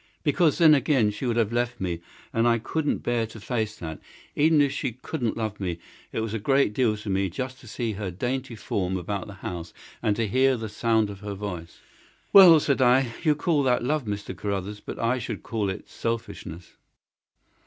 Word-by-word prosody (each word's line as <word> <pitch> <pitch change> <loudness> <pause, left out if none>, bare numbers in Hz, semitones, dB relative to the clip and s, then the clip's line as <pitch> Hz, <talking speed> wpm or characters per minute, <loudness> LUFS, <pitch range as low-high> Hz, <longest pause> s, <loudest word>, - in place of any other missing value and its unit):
"Because 155 +1 +3
then, 160 -3 +7
again, 135 -6 +3
she 105 +5 -4
would 120 - +1
have 115 -1 +1
left 120 0 -1
me, 85 -3 -3 0.3
and 115 +1 +3
I 115 0 +4
couldn't 150 +6 -2
bear 120 -2 0
to 110 0 -11
face 110 -1 -2
that. 80 -5 -7 0.4
Even 155 +1 +4
if 140 -1 +3
she 135 -4 -2
couldn't 125 -1 -3
love 110 -2 -3
me 90 -4 -2 0.3
it - - -2
was 110 -1 -3
a 115 - -1
great 135 0 +2
deal 110 -3 +2
to 105 - -10
me 95 0 +1
just 130 +8 -5
to 120 - -15
see 115 +1 -3
her 100 -2 -4
dainty 125 +7 -3
form 95 -3 -2
about 95 +2 -4
the 105 - -9
house, 85 -1 -5 0.3
and 105 - +1
to 110 +1 0
hear 130 +4 +3
the 110 -1 -5
sound 110 -1 +1
of 100 - -10
her 100 -1 -5
voice." 90 -5 -7 0.5
"Well," 180 -5 +10
said 140 -2 +1
I, 125 -1 +4
"you 155 -1 +3
call 150 0 +1
that 125 -3 +2
love, 145 +1 0
Mr. 100 -1 -4
Carruthers, 100 0 -3
but - - -7
I 120 +3 +1
should 115 -3 -5
call 105 -4 -1
it 95 - -6
selfishness." 115 -6 -5
115 Hz, 205 wpm, -26 LUFS, 100-130 Hz, 0.5 s, Well